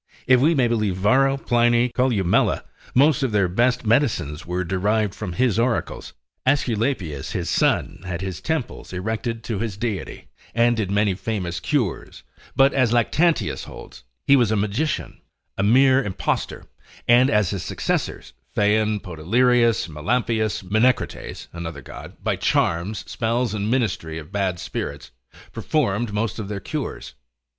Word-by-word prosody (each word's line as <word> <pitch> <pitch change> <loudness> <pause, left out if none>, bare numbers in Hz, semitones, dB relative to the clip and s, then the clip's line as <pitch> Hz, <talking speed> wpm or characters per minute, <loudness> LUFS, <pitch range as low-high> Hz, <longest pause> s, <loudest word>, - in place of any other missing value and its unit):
If 130 -1 +5
we 160 +4 +4
may 130 -4 +3
believe 110 -5 0
Varro, 135 +8 +3
Pliny, 120 -1 +2
Columella, 120 -8 +1 0.3
most 145 +2 +4
of 135 -3 0
their 100 -3 +2
best 120 +7 +1
medicines 105 - +1
were 90 +1 -1
derived 100 +3 0
from 100 -5 -5
his 115 +2 +1
oracles. 120 0 -1 0.3
Aesculapius 115 - 0
his - - -2
son - - +1
had 90 -2 -4
his 95 -2 -5
temples 155 -11 -3
erected 110 +5 -3
to 110 -4 -3
his 110 -3 -3
deity, 105 -3 -4 0.3
and 120 0 +4
did 110 -4 -2
many 100 0 +2
famous 90 -3 -3
cures; 120 - -2 0.3
but, 135 +1 +5
as 130 -4 +2
Lactantius 150 +8 +1
holds, 65 - -11 0.2
he 140 - +6
was 120 -5 +3
a 110 - +1
magician, 105 +10 -2 0.3
a - - -2
mere 130 +6 +5
impostor, 100 -5 -2 0.4
and 125 +3 +6
as 105 -6 +2
his 100 -3 -3
successors, - - -3 0.2
Phaon, 105 0 +2
Podalirius, 115 +6 +2
Melampius, 110 +7 -1
Menecrates, 110 +7 0
(another 80 -5 -6
God), - - -10
by - - +1
charms, 85 +6 0
spells, 115 0 -1
and 105 0 -2
ministry 100 -10 -1
of 80 -1 -9
bad 95 -3 -1
spirits, 70 -5 -5 0.4
performed 120 -8 -1
most 105 +1 -2
of 105 - -4
their 105 -1 -4
cures. - - -5
110 Hz, 145 wpm, -22 LUFS, 95-125 Hz, 0.4 s, he